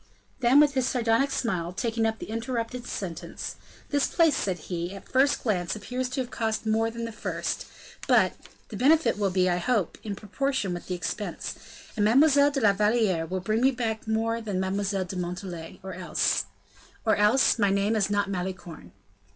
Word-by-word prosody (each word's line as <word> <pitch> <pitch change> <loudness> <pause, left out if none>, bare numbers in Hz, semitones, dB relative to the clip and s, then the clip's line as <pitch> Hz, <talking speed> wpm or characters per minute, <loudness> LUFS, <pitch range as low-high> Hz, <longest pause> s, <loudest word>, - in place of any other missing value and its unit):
Then 255 +2 +5
with 295 -1 +5
his 260 -2 +1
sardonic 240 +2 +2
smile, 185 -10 -1
taking 225 +2 0
up 220 0 -2
the - - -8
interrupted 235 +1 -3
sentence: 170 -5 -5 0.4
"This 285 -1 +2
place," 325 -4 +3
said 190 -7 -1
he, 175 +3 -5
"at 195 - -11
first 270 +2 +2
glance, 180 -6 0
appears 250 +5 -3
to 260 +1 -2
have 250 0 -6
cost 225 -1 -2
more 220 +1 +2
than 230 0 -5
the 230 - -5
first; 215 - -3 0.4
but - - +4 0.4
the - - -6
benefit 305 -4 +3
will 200 -2 +2
be, 185 0 +2
I 175 -1 +2
hope, 205 -1 0
in 205 -2 -4
proportion 210 0 -2
with 175 - -7
the 180 - -2
expense, 175 - -4 0.4
and 210 - +1
Mademoiselle 280 +5 +5
de 280 -2 -2
la 205 -3 +5
Valliere 210 -5 +2
will 185 +1 -3
bring 215 +4 0
me 260 - +5
back 230 -4 -3
more 225 +1 0
than 205 -4 -2
Mademoiselle 195 0 -1
de 180 - -7
Montalais, 175 -2 -5
or 190 -1 -6
else, 180 0 0 0.6
or 220 - +4
else 215 +4 +4
my 205 -2 +4
name 200 +3 +1
is 205 -3 +1
not 205 0 +1
Malicorne. 180 - -6
215 Hz, 185 wpm, -27 LUFS, 190-245 Hz, 0.6 s, Then